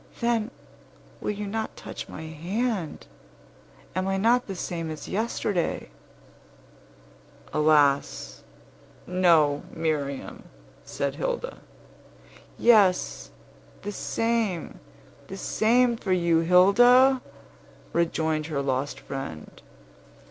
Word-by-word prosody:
Then, 235 Hz, -1 st, 0 dB, 0.7 s
will -, -, -4 dB
you 210 Hz, 0 st, -3 dB
not 220 Hz, +2 st, -4 dB
touch -, -, -8 dB
my 160 Hz, -, -8 dB
hand? 175 Hz, +4 st, -3 dB, 0.9 s
Am 185 Hz, +1 st, -1 dB
I 195 Hz, 0 st, 0 dB
not 235 Hz, +5 st, +2 dB
the 195 Hz, -, -5 dB
same 170 Hz, -2 st, -4 dB
as 155 Hz, -1 st, -7 dB
yesterday?" 200 Hz, -, -2 dB, 1.6 s
"Alas! 150 Hz, -2 st, +2 dB, 0.6 s
no, 165 Hz, -6 st, +3 dB
Miriam!" 150 Hz, -4 st, -3 dB, 0.4 s
said -, -, -3 dB
Hilda. -, -, -3 dB, 1.0 s
"Yes, 205 Hz, -6 st, +3 dB, 0.5 s
the 205 Hz, -, -4 dB
same, 225 Hz, -5 st, -2 dB, 0.5 s
the 195 Hz, -, -7 dB
same 240 Hz, +4 st, +2 dB
for 195 Hz, -, -4 dB
you, 170 Hz, -2 st, +3 dB
Hilda," 245 Hz, +10 st, +6 dB, 0.7 s
rejoined 160 Hz, -2 st, 0 dB
her 145 Hz, -3 st, -2 dB
lost 135 Hz, +1 st, -2 dB
friend. 80 Hz, -, -7 dB
185 Hz, 90 wpm, -26 LUFS, 155-225 Hz, 1.6 s, Hilda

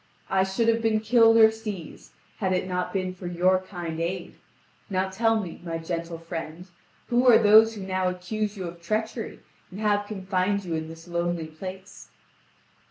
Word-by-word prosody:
I 190 Hz, 0 st, +3 dB
should 195 Hz, +4 st, 0 dB
have 230 Hz, 0 st, +3 dB
been 220 Hz, -1 st, +2 dB
killed 225 Hz, +1 st, +5 dB
or 220 Hz, -1 st, +8 dB
seized, 210 Hz, -7 st, -8 dB, 0.2 s
had 190 Hz, -3 st, 0 dB
it 185 Hz, 0 st, -1 dB
not 180 Hz, -1 st, -2 dB
been 185 Hz, -2 st, -2 dB
for 185 Hz, -1 st, -8 dB
your 180 Hz, +2 st, +3 dB
kind 175 Hz, -4 st, -6 dB
aid. 175 Hz, +1 st, -3 dB, 0.6 s
Now 190 Hz, -1 st, 0 dB
tell 225 Hz, +3 st, +2 dB
me, 180 Hz, -6 st, -7 dB
my 165 Hz, -1 st, -3 dB
gentle 165 Hz, 0 st, -4 dB
friend, 165 Hz, 0 st, -7 dB, 0.4 s
who 245 Hz, +1 st, +3 dB
are 240 Hz, -, +9 dB
those 220 Hz, +1 st, +6 dB
who 205 Hz, -, -7 dB
now 185 Hz, -1 st, -1 dB
accuse 205 Hz, +3 st, -3 dB
you 190 Hz, -, -4 dB
of 170 Hz, 0 st, -8 dB
treachery, 220 Hz, +5 st, -3 dB, 0.3 s
and 190 Hz, -, -9 dB
have 205 Hz, -1 st, +1 dB
confined 195 Hz, 0 st, -1 dB
you 170 Hz, -, -3 dB
in 160 Hz, 0 st, -2 dB
this 165 Hz, +1 st, -11 dB
lonely 170 Hz, -1 st, -1 dB
place?" 185 Hz, +5 st, -9 dB
190 Hz, 175 wpm, -26 LUFS, 175-215 Hz, 0.6 s, are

